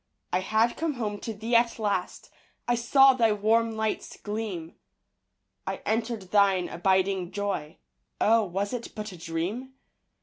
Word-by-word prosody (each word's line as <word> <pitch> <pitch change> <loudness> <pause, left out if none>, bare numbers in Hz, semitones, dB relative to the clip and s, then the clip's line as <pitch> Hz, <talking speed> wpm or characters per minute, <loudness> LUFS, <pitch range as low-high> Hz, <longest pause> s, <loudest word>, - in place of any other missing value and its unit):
I - - +3
had 220 +5 +1
come 320 -2 -1
home 210 -4 -3
to 225 - -5
thee 225 +3 -1
at 235 0 +3
last. 205 -5 -2 0.4
I 240 - +3
saw 270 +3 +5
thy 230 -3 +3
warm 225 +2 +2
lights 220 -1 -2
gleam. 205 -6 -5 0.9
I - - -3
entered 225 -3 -2
thine 195 -3 +4
abiding 190 0 +1
joy, 195 -6 -3 0.4
Oh, 225 +1 +4
was 195 +4 -3
it 240 -1 -6
but 215 -1 -5
a 180 - -10
dream? 180 +11 -4
210 Hz, 145 wpm, -27 LUFS, 190-230 Hz, 0.9 s, saw